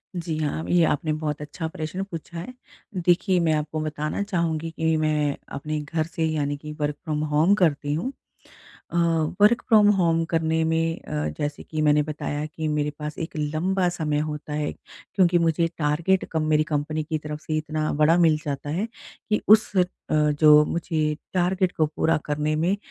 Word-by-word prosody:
जी, 165 -2 -3
हाँ, 155 +1 -2
ये 175 -1 +4
आपने 155 +1 0
बहुत 150 -1 -3
अच्छा 155 +2 -5
प्रश्न 160 +4 -4
पूछा 170 -2 -8
है। 250 +9 -7 0.4
देखिए 180 +1 +2
मैं 160 -2 +2
आपको 155 +1 -2
बताना 155 +2 -3
चाहूँगी 165 -5 -1
कि 160 0 0
मैं 150 -2 +1 0.2
अपने 150 +2 -3
घर 155 +2 -2
से 165 0 -2
यानी 145 -2 -1
कि 150 +1 -8
वर्क 150 0 -1
फ्रॉम 155 -2 -2
होम 160 +7 +4
करती 145 -6 +1
हूँ। 175 - -2 0.8
अ, - - -4 0.4
वर्क 235 +3 +5
फ्रॉम 215 -3 +6
होम 165 -3 +2
करने 160 -1 0
में 165 0 0
अ, 75 0 -3
जैसे 145 0 -3
कि 155 -1 -3
मैंने 150 0 +4
बताया 150 0 -4
कि 155 0 -4
मेरे 150 -1 0
पास 150 0 -6
एक 165 0 -5
लंबा 175 +5 0
समय 155 -4 -1
होता 150 0 -4
है 150 0 -1
क्योंकि 175 -2 0
मुझे 165 0 +2
टारगेट 165 +5 +1
कम 160 - 0
मेरी 155 0 +4
कंपनी 150 +1 -1
की 155 0 -2
तरफ 150 0 -6
से 155 0 -3
इतना 155 0 -2
बड़ा 155 +3 +4
मिल 165 -3 +5
जाता 145 0 -4
है 195 +8 -1 0.4
कि 210 -1 +1
उस 215 +1 +6
अ, 180 - +5 0.3
जो 150 0 +5
मुझे 155 -2 -1 0.2
टारगेट 185 0 +1
को 155 - +3
पूरा 160 +2 +1
करने 150 +1 -1
में 175 +6 +1
155 Hz, 180 wpm, -24 LUFS, 150-170 Hz, 0.8 s, फ्रॉम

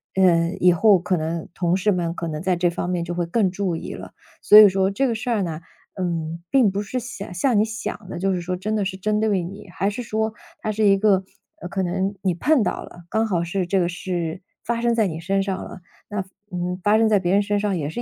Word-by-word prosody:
嗯， 175 -1 +3
以 180 0 +5
后 200 +3 +5
可 185 +1 -1
能 160 0 -3
同 175 0 +1
事 210 +2 +2
们 175 -2 -1
可 170 - -4
能 155 -1 -4
在 185 0 +1
这 175 0 +1
方 175 - -3
面 175 -2 -1
就 175 - -4
会 175 -1 -2
更 195 0 +1
注 185 -2 -2
意 - - -6
了。 - - -9 0.3
所 210 - +7
以 215 -1 +11
说 190 0 +1
这 235 +8 0
个 235 - 0
事 220 - -4
儿 220 -5 +1
呢， 165 -2 -4 0.3
嗯， 170 -3 -3
并 250 -8 +4
不 200 +2 -2
是 250 +5 -3
想 220 -6 -7
像 220 +6 +1
你 - - +5
想 220 -3 -6
的， - - -5
就 195 +1 +1
是 180 - -2
说 180 +1 -3
真 215 +4 -2
的 210 - +1
是 190 0 -4
针 210 +2 0
对 200 -5 +1
你， 200 +3 -9
还 195 +3 0
是 215 +4 -5
说， 220 0 -1 0.3
它 215 - -2
是 215 +1 0
一 195 -1 +5
个， 195 -2 +3 0.4
呃， - - -5
可 195 0 -1
能 190 +3 -1
你 185 -2 +1
碰 270 - +2
到 - - -2
了， 175 - -13
刚 220 +1 +1
好 175 -5 0
是 180 +2 -2
这 190 +2 +1
个 175 - +2
事 175 -1 -4 0.2
发 235 +1 -2
生 235 0 +2
在 220 -3 +2
你 160 -3 -5
身 195 +3 0
上 195 -1 -3
了。 - - -9 0.3
那， 205 -2 -2 0.3
嗯， 180 0 -3
发 210 +1 +4
生 225 0 +4
在 210 - +4
别 180 0 0
人 200 - +4
身 205 0 0
上 205 -3 0
也 145 -3 -3
是 240 - -4
190 Hz, 280 characters per minute, -22 LUFS, 175-210 Hz, 0.4 s, 以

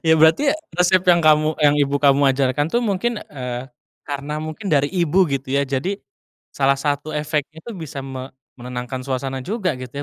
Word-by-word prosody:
Ya 160 - +6
berarti 160 - +5 0.2
resep 180 +1 +3
yang 175 -1 +6
kamu 155 0 +4
yang 145 0 +5
ibu 140 0 +2
kamu 140 0 +5
ajarkan 140 +2 +1
tuh 240 - +2
mungkin, 215 +2 -1
eee, 125 -1 -5 0.3
karena 145 +1 -5
mungkin 155 +6 -7
dari 145 -1 +3
ibu 180 0 +2
gitu 135 0 -2
ya? 140 - +3
Jadi 140 +9 -2 0.5
salah 140 0 +2
satu 145 +1 -2
efeknya 150 +1 -2
tuh, 235 - -6
bisa 145 -4 -6
me 130 -1 -6 0.3
menenangkan 125 +1 -5
suasana 130 0 -3
juga 190 - -2
gitu 125 -1 -8
145 Hz, 175 wpm, -21 LUFS, 135-165 Hz, 0.5 s, Ya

